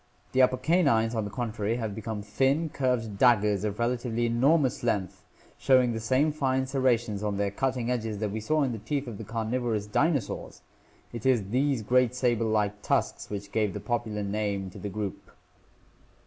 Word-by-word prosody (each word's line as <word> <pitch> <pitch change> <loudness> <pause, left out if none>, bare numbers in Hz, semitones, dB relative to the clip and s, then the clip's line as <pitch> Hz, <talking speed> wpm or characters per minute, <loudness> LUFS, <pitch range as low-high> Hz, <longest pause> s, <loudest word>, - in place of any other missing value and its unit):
The 130 - +3
upper 130 0 +4
canines, 130 -7 +2
on 110 -3 -1
the - - -4
contrary, 110 -1 -2
have 110 -4 -3
become 110 -1 -5
thin 135 +10 +1
curved 120 -7 -1
daggers 105 -5 +4
of 105 -1 -2
relatively 120 0 0
enor 130 +8 +4
mous 130 -4 -1
length, 100 -5 -2 0.4
showing 130 -3 +4
the 115 - -3
same 130 +7 +2
fine 130 -3 0
serrations 120 -6 0
on 105 -2 -2
their 100 -1 0
cutting 125 +1 -1
edges 110 -4 -2
that 105 0 -2
we 110 - -3
saw 155 +8 +1
in 130 - 0
the 115 - -5
teeth 140 +6 -2
of 115 -5 -7
the - - -5
carnivorous 115 -1 -2
dinosaurs! 140 +3 -1 0.5
It 115 +1 -3
is 115 -7 +2
these 130 0 +1
great 125 +2 +2
saber 120 -3 +1
like 105 -1 0
tusks - - -1
which 100 -1 -6
give 105 -4 0
the - - -3
popular 115 -4 -2
name 100 -2 -2
to - - -11
the 100 - -4
group. 100 0 -5
115 Hz, 185 wpm, -28 LUFS, 105-130 Hz, 0.5 s, upper